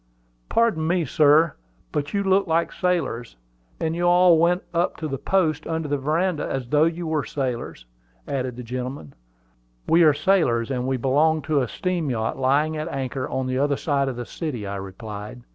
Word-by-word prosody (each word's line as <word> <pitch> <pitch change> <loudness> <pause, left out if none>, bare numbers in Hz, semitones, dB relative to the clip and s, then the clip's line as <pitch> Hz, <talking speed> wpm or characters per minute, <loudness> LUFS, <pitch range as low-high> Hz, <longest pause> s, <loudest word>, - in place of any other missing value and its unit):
"Pardon 220 -9 +2
me, 175 -1 +1
sir; 150 +3 +4 0.4
but 145 -1 -2
you 200 0 0
look 190 0 +2
like 165 +1 +1
sailors; 155 - -2 0.4
and 160 0 -1
you 175 - -3
all 175 -1 +6
went 175 +2 +2
up 170 +1 0
the 145 -5 -3
posts 160 -5 0
under 160 -1 -2
the 145 -1 -1
veranda 160 +4 0
as 130 -2 -3
though 150 +2 +4
you 170 +1 -2
were 155 -2 0
sailors," 120 - -4 0.4
added 130 -3 -2
the 125 - -7
gentleman. 125 - -6 0.7
"We 170 - +5
are 155 -3 +6
sailors, 145 -8 +2
and 125 -1 -2
we 130 0 0
belong 150 +5 +2
to 145 -1 +1
a 125 - -1
steam 175 +1 -2
yacht 110 -3 -1
lying 145 +4 +2
at 155 - -3
anchor 130 -1 -3
on 130 - -2
the 130 0 -1
other 140 0 +1
side 140 -3 0
of 130 - -5
the 120 0 -5
city," 135 -10 -5
I 100 0 -4
replied. 105 +4 -8
145 Hz, 185 wpm, -23 LUFS, 130-165 Hz, 0.7 s, all